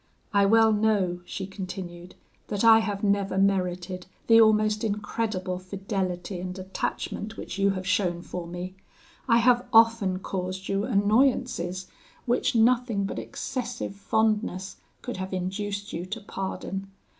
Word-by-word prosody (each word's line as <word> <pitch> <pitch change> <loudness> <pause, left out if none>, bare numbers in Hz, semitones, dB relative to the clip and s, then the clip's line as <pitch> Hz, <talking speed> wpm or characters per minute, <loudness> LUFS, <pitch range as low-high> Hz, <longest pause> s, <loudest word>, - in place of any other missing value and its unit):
I 200 -1 +5
well 225 +1 +5
know,' 205 -5 +1
she 190 - -5
continued, 185 -2 -7 0.3
'that 205 0 -2
I 225 -1 +8
have 205 -2 -3
never 200 -1 +1
merited 185 -2 0 0.2
the 230 0 +7
almost 215 0 +3
incredible 205 -3 -2
fidelity 185 -1 -3
and 180 +1 -5
attachment 195 +3 -4
which - - -6
you 200 0 +4
have 185 - -5
shown 180 -2 0
for 175 -2 -6
me. 175 +2 -6 0.5
I 230 -2 +5
have 245 +1 +4
often 225 -5 +5
caused 185 0 -4
you 195 +1 0
annoyances, 210 -4 +1 0.4
which 250 +1 +1
nothing 230 -3 +3
but - - -4
excessive 245 -5 -4
fondness 210 -2 0 0.3
could 245 - -5
have 190 0 -4
induced 200 +3 -3
you 175 +2 -4
to 210 +4 -4
pardon. 195 0 -5
200 Hz, 135 wpm, -27 LUFS, 185-220 Hz, 0.5 s, I